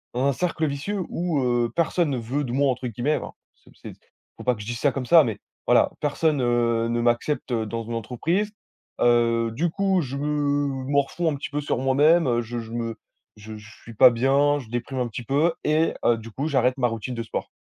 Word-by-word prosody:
dans 125 +2 +1
un 140 - +3
cercle 160 +3 -1
vicieux 170 +8 -3
où 170 -4 -1
heu, 120 -2 +1
personne 170 0 +1
ne 135 - -1
veut 125 +5 -2
de 125 - -4
moi 140 +1 +3
«entre 125 0 -4
guillemets». 120 +7 -1
Enfin, - - -7 0.2
c'est - - -24
ps - - -24
c'est - - -7
ps - - -21
il - - -44
faut - - -9
pas 125 -1 +2
que 105 - -10
je - - -8
dise 120 -1 -4
ça 145 - +2
comme 130 -1 -4
ça, 165 +4 +7
mais 110 -6 -3 0.3
voilà, - - +4
personne, 150 0 +1
heu, 120 -1 +1
ne 120 0 0
m'accepte 120 +3 0
dans 115 0 -2
une 115 +1 -6
entreprise. 165 - -1 0.5
Heu, 115 -1 +3
du 170 +9 0
coup, 195 +1 +1
je 135 -2 -5
me 145 -2 -1
morfonds 145 +4 +1
un - - -2
petit 140 - -6
peu 145 0 -2
sur 145 - -1
moi-même 145 +5 +4
heu, 120 -1 +1
je 120 +1 -6
je 115 -1 -8
me 115 -1 -3 0.4
je 110 +1 -9
j - - -11
je 110 - -16
suis 115 - -11
pas 130 +4 +8
bien, 140 +4 +2
je 125 -5 -11
déprime 120 +3 -4
un 125 - 0
petit 120 +1 -7
peu 145 +8 +1
et 155 +2 +2
heu, 120 - +4
du 115 +1 -10
coup 140 +7 -3
j'arrête 130 -3 +1
ma 125 -2 +2
routine 115 +2 -5
de 115 - -3
sport. 115 - -5
130 Hz, 240 wpm, -24 LUFS, 120-145 Hz, 0.5 s, pas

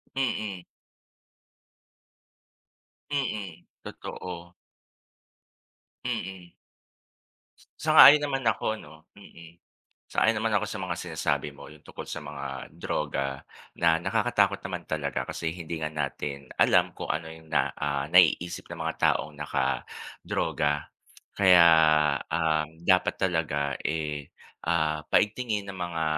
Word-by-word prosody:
Mm. 105 -9 -2 2.4
Mm, 105 - -3 0.2
totoo. 85 -1 -8 1.5
Mm. 90 -1 -5 1.3
Sang-ayon 145 +2 +9
naman 135 -3 -2
ako 110 -1 +1
'no, 80 -5 -14
mm. 85 -4 -14 0.5
Sang-ayon 110 -1 +2
naman 110 -1 0
ako 100 - +2
sa - - -5
mga - - -3
sinasabi 70 0 -2
mo, 70 - -12
yung 75 -1 -15
tungkol - - -9
sa - - -6
mga 70 -3 -7
droga 70 -2 -3 0.3
na 80 -1 +3
nakakatakot - - +1
naman - - -5
talaga - - -2
kasi 80 -1 -3
hindi 85 -1 -6
nga 75 - -2
natin 70 -1 -4
alam - - +3
kung - - -3
ano 80 +1 -3
yung 80 0 -12
na, - - +3
ah, 70 -1 -2
naiisip 90 0 +3
ng - - -7
mga - - -2 0.2
taong 75 -1 -4
nakadroga 75 +1 -2 0.5
kaya, 90 -4 +7 0.6
um, 80 -2 +1 0.2
dapat 95 -1 +4
talaga 80 -6 0
eh, 75 -3 -3 0.4
ah, 80 -2 +1
paigtingin 105 -1 +1
ng 95 - -6
mga 85 -3 -3
80 Hz, 110 wpm, -27 LUFS, 75-95 Hz, 2.4 s, Sang-ayon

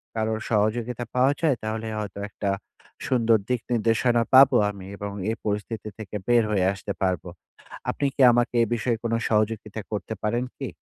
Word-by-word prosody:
কারো 110 0 0 0.2
সহযোগিতা 115 +3 0
পাওয়া 130 +2 +4
যায়, 155 -5 +3
তাহলে 110 +1 -3
হয়তো 105 -1 -6
একটা 100 - -5 0.6
সুন্দর 115 -3 +3
দিক-নির্দেশনা 120 0 +1
পাবো 135 0 +8
আমি 100 -2 -8
এবং 100 0 -5 0.2
এ - - 0
পরিস্থিতি 105 +1 -3
থেকে 110 -1 -8
বের 120 -1 +5
হয়ে 95 -3 +2
আসতে 100 +1 -5
পারবো। 95 -1 0 0.6
আপনি 145 - -1
কি - - 0
আমাকে 120 0 +1
এ - - +2
বিষয়ে 115 0 0
কোনো 115 0 0
সহযোগিতা 110 0 0
করতে 105 +1 -3
পারেন 120 +3 0 0.2
কি? - - -3
110 Hz, 160 wpm, -25 LUFS, 105-120 Hz, 0.6 s, পাবো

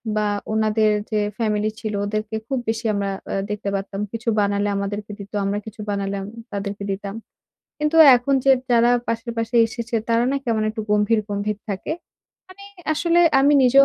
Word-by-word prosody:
বা 210 0 +1 0.3
ওনাদের 215 0 +2 0.2
যে 215 - +1 0.2
ফ্যামিলি 215 -2 0
ছিল 215 -2 -4
ওদেরকে 215 +1 -3
খুব 270 - -1
বেশি 225 +1 -2
আমরা 200 -1 -1 0.2
আ - - -1
দেখতে 210 -1 -3
পারতাম। 195 0 -4
কিছু 230 +1 -3
বানালে 200 0 +1
আমাদেরকে 205 +1 -4
দিত। 200 0 -9
আমরা 200 +1 0
কিছু 220 0 -9
বানালাম, 200 -1 -2 0.3
তাদেরকে 200 0 -4
দিতাম। 195 +1 -5 0.6
কিন্তু 300 +2 0 0.2
এখন 245 +3 0
যে 275 - +5 0.2
যারা 235 0 +5 0.2
পাশের 230 +1 -2
বাসায় 230 +1 +3
এসেছে 235 +1 -6
তারা 230 +1 +3
না - - +1
কেমন 225 -2 0
একটু 220 0 -5
গম্ভীর, 210 +1 +3
গম্ভীর 205 0 -2
থাকে। 195 +8 -3 0.6
মানে 385 +2 -13 0.3
আসলে 340 +2 +3 0.2
আমি 285 +2 +5
নিজেও 265 +2 +7
215 Hz, 170 wpm, -22 LUFS, 205-235 Hz, 0.6 s, নিজেও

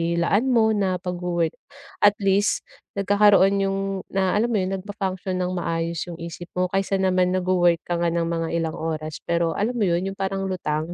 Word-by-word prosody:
ilaan 195 +8 +2
mo 230 -4 +4
na 195 -3 +1
pagwo-work. 175 -2 -2 0.5
At 205 0 +5
least 195 +2 +2 0.3
nagkakaroon 200 0 +4
yung 195 0 -1 0.3
na 190 -1 0
alam 215 +3 +2
mo 195 - +2
yun, 185 - -2
nag-function 190 -1 -4
ng 180 - -2
maayos 170 -1 -2
yung 175 - -6
isip 170 +1 -8
mo, 180 0 0
kaysa 195 0 0
naman 185 -1 +2
nagwo-work 180 -2 +2
ka 175 -1 -2
nga 170 - +1
ng 170 0 0
mga 165 0 -1
ilang 165 -1 0
oras 155 -1 -4
pero 170 -1 +1
alam 225 +5 0
mo 230 - +1
yun 180 0 +1
yung 195 - -5
parang 195 0 -2
lutang 160 -4 -2
185 Hz, 185 wpm, -23 LUFS, 170-195 Hz, 0.5 s, At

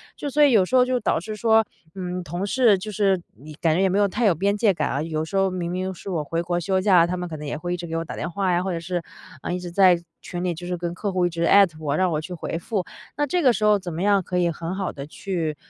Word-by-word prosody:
就 290 - -4
所 295 +2 +1
以 290 -2 +7
有 205 -4 +6
时 250 +8 +1
候， 250 - +6
就 255 0 0
导 210 - +1
致 215 +5 -6
说， 220 +1 +3 0.3
嗯， 180 -1 -4
同 175 +4 -4
事 230 -2 +4
就 190 +3 -7
是 195 -3 +1 0.2
以 155 +1 -10
感 160 0 +1
觉 180 - +2
也 195 - +3
没 195 +2 +1
有 205 - +4
太 220 +5 -1
有 200 - +5
边 200 +5 0
界 210 -1 +3
感 155 -4 -1
啊， 140 - -1
有 155 0 -2
时 160 - -7
候 195 0 +3
明 180 -2 -3
明 185 +1 -3
是 185 - -9
我 165 -5 -1
回 165 +3 -2
国 175 0 -2
休 190 +2 0
假， 185 -3 +5
他 180 +1 -2
们 180 0 -4
可 165 - -6
能 150 0 -7
也 145 - -3
会 175 +3 -3
一 - - -2
直 175 - -6
给 165 -1 -3
我 165 - -3
打 - - -7
电 165 - -4
话 190 0 0
呀， 175 +1 +1
或 190 - -2
者 170 - -2
是， 175 +1 -3 0.4
嗯， - - -3
一 - - -3
直 180 -1 -7
在 180 -2 +5 0.2
群 175 -1 -6
里， 180 -1 0
就 175 +2 -8
是 180 - -2
跟 175 0 -3
客 200 +3 -3
户 180 -1 +2
一 - - +1
直 170 0 -3
艾 200 +3 +7
特 160 -4 -13
我， 150 -2 -1
让 185 +1 +2
我 155 - 0
去 180 +3 -7
回 165 -1 -4
复。 210 0 -2 0.3
那 295 - +1
这 355 +5 0
个 260 -6 +5
时 215 - -3
候 210 -1 +4
怎 175 -3 -6
么 165 - -4
样 200 0 +3
可 180 0 -3
以 175 -1 +2
很 165 +3 -5
好 190 -1 -2
地 140 0 -8
去 165 -2 -3
180 Hz, 345 characters per minute, -23 LUFS, 170-200 Hz, 0.4 s, 以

